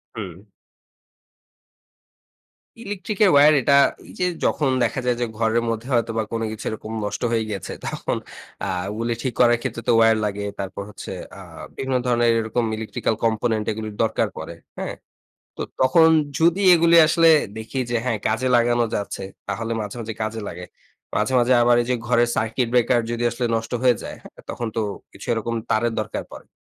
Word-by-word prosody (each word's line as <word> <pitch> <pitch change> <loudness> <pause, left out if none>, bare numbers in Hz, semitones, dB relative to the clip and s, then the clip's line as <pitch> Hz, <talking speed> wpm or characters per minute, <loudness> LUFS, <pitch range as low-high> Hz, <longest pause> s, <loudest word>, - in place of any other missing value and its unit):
হুম। - - -5 2.5
Electric 205 0 -5
এর 190 - +5
wire 150 +1 +7
এটা 140 - +4 0.3
এই - - -12
যে 180 - +2 0.2
যখন 145 -3 +1
দেখা 115 +3 0
যায় 125 -1 +1
যে, - - +2
ঘরের 115 +1 +1
মধ্যে 115 +2 -3
হয়তোবা 115 -2 +1
কোন 115 -1 -2
কিছু 110 - -8
এরকম 110 0 -7
নষ্ট - - -4
হয়ে 115 -1 +1
গিয়েছে 100 -4 -5
তখন - - -2 0.5
আ - - -2 0.2
ওগুলি 115 +2 -2
ঠিক 130 -3 -2
করার 120 -1 +5
ক্ষেত্রে 115 - -4
তো - - +4
wire 110 -1 +5
লাগে। 100 0 -3
তারপর 95 +1 -5
হচ্ছে 105 - -9 0.3
আ - - -9 0.3
বিভিন্ন 130 -1 -1
ধরনের 120 -1 +2
এরকম 115 +1 -1
ইলেকট্রিক্যাল 110 0 -2
component 110 -1 0
এগুলির 110 -1 -6
দরকার 110 0 +1
পড়ে। - - -7 0.2
হ্যাঁ? - - -4 0.6
তো - - -3 0.2
তখন 145 +6 +5 0.3
যদি 175 +4 +3
এগুলো 170 0 +4
আসলে 165 +1 +5 0.3
দেখি 110 +4 -5
যে 120 - +1
হ্যাঁ, 120 -4 0
কাজে 115 +4 0
লাগানো 120 0 +3
যাচ্ছে, 100 -1 -4 0.2
তাহলে 115 0 -3
মাঝে, 105 +1 -5
মাঝে 110 -1 -5
কাজে 110 +1 -3
লাগে। 90 +1 -7 0.5
মাঝে, - - 0
মাঝে 120 +1 +3
আবার 120 0 +5
এই - - -7
যে - - +3
ঘরের 120 0 +3
সার্কিট 115 +3 0
ব্রেকার 120 0 +4
যদি 120 0 -2
আসলে 120 +1 -2
নষ্ট 115 +1 -5
হয়ে 125 -2 +4
যায় - - -7 0.3
তখন 120 - -4
তো - - +1 0.3
কিছু - - -11
এরকম 115 0 -2 0.2
তারের 115 +2 +2
দরকার 110 - -4
পড়ে। - - -11
115 Hz, 175 wpm, -22 LUFS, 110-125 Hz, 2.5 s, wire